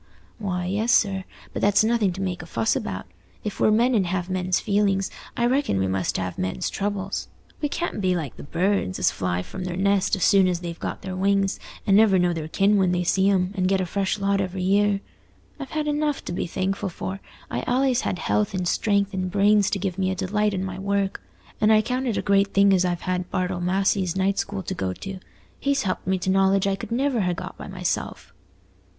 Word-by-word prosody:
"Why, 180 -4 -2
yes, 210 +6 0
sir; 195 -5 +2 0.3
but - - -3
that's 205 +1 +4
nothing 220 -3 +2
to 190 - -6
make 180 -3 -3
a 165 - -10
fuss 115 -7 0
about. 95 -1 -4 0.4
If 205 - -5
we're - - +4
men 235 +4 +3
and 200 -6 +2
have 180 0 -2
men's 185 0 +1
feelings, 200 -2 +1 0.3
I 235 - +2
reckon 260 - +1
we 95 - +1
must 95 -1 -1
have 90 -1 -4
men's 95 0 -2
troubles. 200 -1 -3 0.3
We 295 - 0
can't 340 -8 -3
be 185 -1 +2
like 155 -7 -4
the - - -10
birds, 170 - 0
as - - +2
fly 90 -1 -2
from 185 - -7
their 180 -1 -4
nest 200 0 +2
as 190 - -2
soon 195 -2 +5
as 175 -1 -1
they've 170 -1 -6
got - - -5
their 190 -1 -4
wings, 195 +1 +1 0.3
and 195 - +4
never 210 -2 +6
know 180 -1 +2
their 160 -2 -4
kin 200 +5 +3
when 185 -2 +3
they 180 0 +1
see 190 +3 +3
'em, 190 -1 +1
and 185 -1 +1
get 195 0 +2
a 185 - 0
fresh 195 +3 -1
lot 200 0 +1
every 185 -1 -3
year. 200 +1 +2 0.6
I've 275 -2 -6
had 305 +1 -2
enough 295 -1 -1
to - - -4
be 175 - -2
thankful 190 +2 -2
for: 190 +2 -5 0.3
I've - - -3
allays 255 0 +2
had - - -2
health 105 - 0
and 180 -1 -1
strength 200 +1 +1
and 185 -1 -2
brains 205 +1 +4
to - - -1
give 190 -1 -3
me 190 -1 +1
a 190 - -1
delight 205 +2 0
in 185 - -2
my 190 0 -5
work; 200 0 -1 0.4
and 215 0 +5
I 215 0 +5
count 255 +3 -2
it 230 - 0
a - - -1
great 200 0 +2
thing 200 0 +6
as 185 -1 +3
I've 175 -1 -1
had 185 -1 -2
Bartle 180 -1 -1
Massey's 190 0 +1
night 190 +1 +1
school 200 -1 -3
to - - -3
go 95 -1 -2
to. 190 - -7 0.4
He's 280 0 +1
helped 185 -2 -3
me 190 0 +2
to 185 +1 -1
knowledge 195 0 +3
I 195 -1 +1
could 195 - -8
never 255 -1 +1
ha' 180 -2 0
got 180 +2 -7
by - - -9
myself." 185 -2 -3
195 Hz, 230 wpm, -24 LUFS, 180-205 Hz, 0.6 s, never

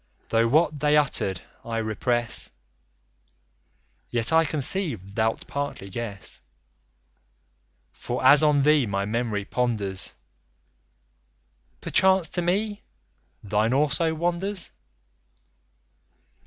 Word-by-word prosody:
Though, 115 0 +3
what 155 +3 +2
they 150 +1 +3
utter'd, 100 - 0 0.2
I 115 -1 -4
repress, 115 +2 -1 1.6
Yet 120 +3 +2
I 165 0 +5
conceive 155 - 0
thou'lt 110 +1 -1
partly 140 -9 -5
guess 105 -2 -5 1.5
For - - -4
as 145 - +8
on 150 -2 +3
thee, 150 -4 +4
my 100 0 -1
memory 110 -2 -2
ponders, 105 -7 -2 1.7
Perchance 190 -3 +3
to 175 - -1
me, 205 +4 -1 0.6
thine 105 +3 +1
also 155 +3 +1
wanders. 175 +4 -2
135 Hz, 90 wpm, -25 LUFS, 110-160 Hz, 1.7 s, as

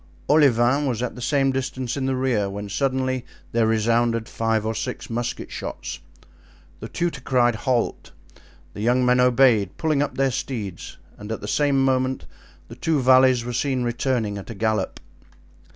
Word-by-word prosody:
Olivain 140 -1 +4
was 120 -2 -1
at 125 - -3
the 125 - -10
same 135 +1 +2
distance 130 -2 -3
in 135 -2 -2
the 135 - 0
rear, 125 -6 0
when 100 +1 -6
suddenly 130 +1 -1 0.3
there 115 -1 +2
resounded 115 +1 +1
five 110 -1 -1
or 110 - -1
six 110 - -5
musket 120 +1 -3
shots. - - -6 0.8
The - - -7
tutor 170 -6 -2
cried 125 -2 +2
halt; 120 +2 -1 0.6
the 105 - -7
young 125 +3 +2
men 125 0 +4
obeyed, 125 -6 +3
pulling 155 -3 +1
up 145 - -2
their 135 0 +2
steeds, 115 -8 -5 0.2
and 105 +1 -7
at 110 - -4
the - - -6
same 140 -2 +2
moment 130 0 0 0.4
the - - -10
two 160 -3 0
valets 130 -1 +5
were 125 - -4
seen 130 0 0
returning 120 -4 -1
at 95 - -11
a 115 - -6
gallop. 110 -1 -1
125 Hz, 170 wpm, -23 LUFS, 115-130 Hz, 0.8 s, valets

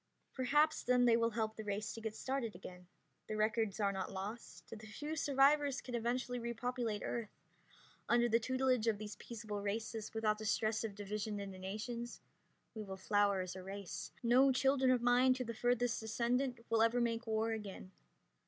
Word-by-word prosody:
Perhaps 295 +4 +3
then 250 0 +3
they 235 -1 +6
will 230 0 +3
help 220 -1 -2
the 220 - -6
race 210 +1 -3
to 225 - -8
get 220 -1 -4
started 255 -4 -2
again. 180 0 -10 0.4
The 215 - -3
records 215 -1 +1
are 200 -1 +2
not 195 - -4
lost. 205 +5 -7
The 220 -1 -8
few 295 +9 -5
survivors 280 -1 +3
can 250 - -8
eventually 245 +1 -1
repopulate 235 -2 -2
Earth. 230 -3 -3 0.8
Under 240 0 +4
the 230 0 +3
tutelage 255 -1 +1
of 220 -2 +2
these 210 0 -6
peaceable 215 -3 -6
races, 220 +1 -3
without 215 -1 +1
the 215 - -5
stress 215 +1 +1
of 215 -3 -4
division 205 +1 -3
into 195 -2 -6
nations, 230 +5 -5 0.5
we 220 - -5
will 195 -2 -6
flower 200 0 +2
as 185 0 -5
a 185 - -6
race. 195 0 -6
No 255 +3 +6
children 265 0 +3
of 250 -2 +3
mine 250 +1 +5
to 255 - -2
the 230 -1 -5
furthest 245 0 +1
descendant 240 +2 -1
will 225 -1 +4
ever 230 +2 +4
make 235 0 0
war 220 +1 +1
again. 200 -4 -6
225 Hz, 180 wpm, -36 LUFS, 210-245 Hz, 0.8 s, they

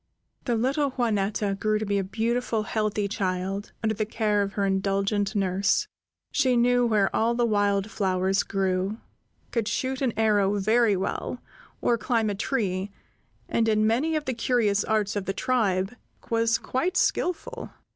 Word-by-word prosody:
The 240 - +1
little 275 +5 +1
Juanetta 210 -4 0
grew 215 0 +1
to 215 - -3
be 200 0 0
a - - -1
beautiful, 225 +3 -1
healthy 215 -1 -1
child, 195 0 -2
under 220 0 +1
the 215 - -1
care 210 -2 +1
of 200 0 -2
her 200 - 0
indulgent 195 +1 0
nurse. 195 0 +1 0.4
She 260 -4 +2
knew 245 0 +3
where 210 -4 +2
all 230 +2 +2
the 240 0 +2
wild 205 -1 +1
flowers 190 -1 +1
grew, 190 +1 -1 0.5
could 230 -3 -1
shoot 260 +4 -2
an 260 -3 +2
arrow 205 -2 +3
very 215 +1 +3
well, 190 - -3 0.4
or 235 -1 +2
climb 225 -2 +1
a - - -1
tree, 200 -3 -1 0.6
and, 225 -1 +1
in 215 0 +3
many 265 +9 +1
of 305 -1 -1
the 260 - -1
curious 230 -4 +1
arts 215 -1 0
of 200 -2 -2
the 195 - -1
tribe, 195 -4 0 0.4
was 230 0 +3
quite 345 +9 -1
skillful. 360 -2 -1
215 Hz, 160 wpm, -26 LUFS, 195-235 Hz, 0.6 s, knew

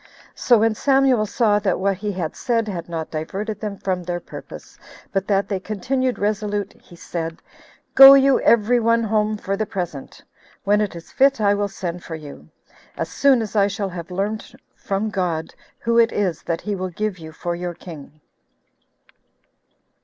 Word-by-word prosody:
So 240 - +3
when 225 +1 +2
Samuel 265 -3 +2
saw 210 -1 +2
that 200 -3 0
what 195 0 0
he 205 +2 -3
had 180 -5 -4
said 230 -3 0
had 175 -4 -5
not 160 -2 -5
diverted 195 +7 -4
them 210 -2 -4
from 185 -1 -2
their 175 0 -3
purpose, - - -11 0.3
but 195 -1 -1
that 200 -1 +1
they 195 -2 -2
continued 250 +6 -2
resolute, 205 -1 -2
he 175 - -18
said, 165 -1 -5 0.5
"Go 270 0 +11
you 275 -1 +4
every 235 +2 +4
one 230 0 +2
home 215 0 0
for 195 -1 -3
the 215 +1 -2
present; 175 -9 -6 0.4
when 205 +1 +3
it 205 -4 -2
is 170 - -11
fit 275 -1 +3
I 205 -1 +3
will 205 0 0
send 180 -3 -6
for 165 - -6
you, 150 -3 -11 0.5
as - - -3
soon 270 -4 +3
as 215 0 -8
I 200 -1 +4
shall 200 0 -3
have 175 -1 -7
learned 210 +7 -4 0.2
from 200 +2 -2
God 175 -5 -2 0.2
who 235 0 +1
it 230 0 +4
is 185 -6 -1
that 165 -1 -3
he 210 - -3
will 185 -1 -3
give 205 +1 -3
you 160 -1 -9
for 175 +2 -4
your 175 0 -5
king." 155 -3 -12
200 Hz, 180 wpm, -21 LUFS, 180-220 Hz, 0.5 s, Go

